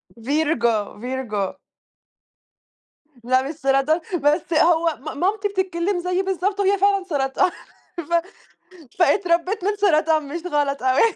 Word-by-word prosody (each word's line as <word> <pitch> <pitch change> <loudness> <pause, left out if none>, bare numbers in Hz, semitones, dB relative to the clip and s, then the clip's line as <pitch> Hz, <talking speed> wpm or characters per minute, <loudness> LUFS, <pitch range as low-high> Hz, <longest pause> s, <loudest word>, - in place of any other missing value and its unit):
Virgo 235 -4 0
،Virgo. 235 -5 -3 1.7
لا 255 +2 +2
مش 315 - -6
سرطان، 275 +3 +1 0.2
بس 305 +3 +1
هو 330 0 +3 0.2
م - - -11
مامتي 405 +4 0
بتتكلّم 380 -1 -1
زيي 360 +1 -1
بالضبط 385 +2 -1
وهي 400 0 +3
فعلًا 395 0 +2
سرطان، 285 -1 0 0.5
ف 340 0 -5 0.9
فأتربّيت 360 +1 +2
من 415 +1 0
سرطان 315 -6 +2
مش 335 +4 -5
غلط 290 -4 -1
أوي. 260 0 +3
325 Hz, 120 wpm, -22 LUFS, 275-375 Hz, 1.7 s, هو